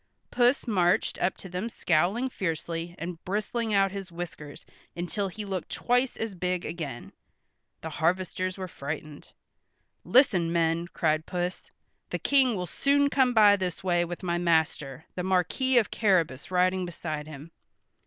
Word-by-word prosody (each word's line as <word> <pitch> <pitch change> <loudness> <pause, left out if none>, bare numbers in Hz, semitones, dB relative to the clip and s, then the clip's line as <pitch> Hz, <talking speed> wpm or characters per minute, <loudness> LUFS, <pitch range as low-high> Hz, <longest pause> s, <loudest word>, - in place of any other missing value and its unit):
Puss 245 +2 +3
marched 180 -7 +1
up 180 - +1
to - - -9
them 185 +5 -4
scowling 185 +7 +1
fiercely 170 - -3
and 170 0 -6
bristling 215 +4 -2
out 195 -2 +3
his 195 -2 -7
whiskers 170 -4 -8 0.3
until 180 +4 -2
he 210 +3 -7
looked 190 -2 -4
twice 245 +1 +1
as 225 -2 -3
big 180 0 -2
again. 150 -7 -6 0.7
The 160 - -6
harvesters 185 +3 -1
were 185 -1 -4
frightened. 150 -1 -7 0.7
"Listen, 195 -10 +4
men," 170 0 +1
cried 155 -3 0
Puss. 180 0 -3 0.4
"The - - -2
King 265 -4 +3
will 180 -2 -2
soon 280 - +2
come 255 -3 +3
by 210 -2 +7
this 185 -3 -4
way 175 -2 +2
with 175 +2 -6
my 175 -1 0
master, 160 -4 0
the 180 - -3
Marquis 190 +8 +1
of 225 - +3
Carrabas 175 - +1
riding 185 0 +2
beside 155 -3 -5
him. 155 +2 -10
180 Hz, 150 wpm, -28 LUFS, 165-205 Hz, 0.7 s, by